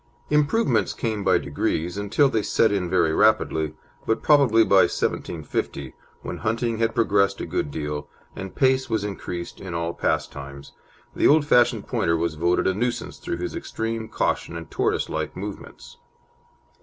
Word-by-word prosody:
Improvements 145 - +2
came 110 -3 -2
by 95 -2 +4
degrees, 80 +3 -2
until 105 +8 +2
they 115 -5 0
set 110 +1 +2
in 95 -4 -1
very 85 -4 +2
rapidly, 80 -7 +2 0.3
but 110 - 0
probably 135 -7 +5
by 100 -3 +5
1750, 70 -4 -3 0.3
when - - -5
hunting 115 +1 -1
had 115 0 0
progressed 100 -4 +2
a - - -3
good - - -2
deal, 75 0 -4 0.3
and 95 -1 -7
pace 130 0 +2
was 110 -3 0
increased 90 -4 -6
in 90 -3 -6
all 85 0 -2
pastimes, 70 -3 -3 0.4
the - - +4
old 150 0 +5
fashioned 120 -4 +3
Pointer 85 0 +1
was 85 0 -1
voted 85 +3 +1
a 95 - +2
nuisance 120 +5 -3
through - - -4
his 90 +1 -4
extreme 115 0 -4
caution 85 - -1
and 80 - -9
tortoise - - 0
like - - -4
movements. 100 +2 -8
100 Hz, 155 wpm, -24 LUFS, 85-115 Hz, 0.4 s, probably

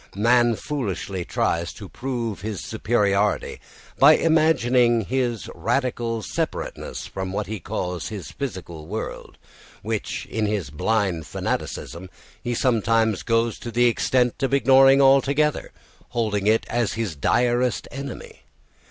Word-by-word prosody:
Man 120 +2 +3
foolishly 100 -9 -4
tries 85 0 -1
to 100 - -10
prove 120 -4 -4
his 105 -1 -4
superiority 105 -2 0 0.4
by 150 +3 +8
imagining 130 -7 +3
his 120 0 -2
radical 120 -4 -1
separateness - - -4
from 95 -1 -5
what 105 +2 -2
he 110 0 -5
calls 90 -2 -4
his 100 -5 -7
physical 90 - -6
world, 110 +5 -6 0.5
which, - - -3
in 110 -1 -2
his 100 -9 -2
blind 90 -1 0
fanaticism, 90 +2 -4 0.3
he 120 0 -2
sometimes 115 -3 +2
goes 115 -1 0
to 120 - -6
the 120 +2 +2
extent 125 +2 +1
of 135 0 +2
ignoring 135 +1 +6
altogether, 140 +2 +3 0.4
holding 105 -4 -1
it 110 +1 +3
at 120 -2 0
his 110 -8 -3
direst 120 - +1
enemy. 140 -2 -8
115 Hz, 125 wpm, -23 LUFS, 100-125 Hz, 0.5 s, by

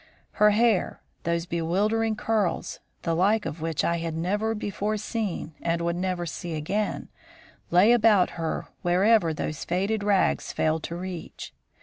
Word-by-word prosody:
Her 210 0 +4
hair 220 -2 +2 0.3
those 170 0 0
bewildering 205 +7 0
curls, 210 -5 -1 0.2
the 165 - 0
like 205 +4 +2
of 160 0 -5
which 160 -3 -1
I 170 - +1
had 165 -1 -3
never 205 +6 0
before 210 +1 -2
seen 210 -7 -3
and 170 0 0
would 170 0 0
never 180 -1 -2
see 165 +1 -5
again, 195 +8 -2 0.6
lay 185 +6 +5
about 215 -5 +4
her 165 -2 -3 0.2
wherever 185 0 +3
those 155 -1 -4
faded 200 +4 -1
rags 200 -2 +2
failed 160 0 0
to 170 - -5
reach. 180 -1 -7
185 Hz, 145 wpm, -26 LUFS, 170-210 Hz, 0.6 s, lay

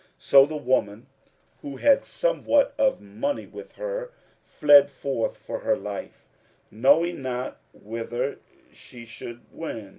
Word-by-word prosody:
So 135 0 +6
the 155 0 -5
woman, 120 -5 -1 0.6
who 140 -2 -7
had 280 -1 +4
somewhat 395 - +1
of 270 -1 +2
money 105 - -3
with - - -12
her, - - -5 0.3
fled 145 -1 +5
forth 135 -4 -3
for - - -6
her - - 0
life, - - -8 0.4
knowing 145 +9 +3
not 125 -1 -4
whither 120 +5 -5 0.3
she 120 -2 -13
should 120 +1 -9
wend. 115 -11 -7
135 Hz, 125 wpm, -25 LUFS, 120-165 Hz, 0.6 s, So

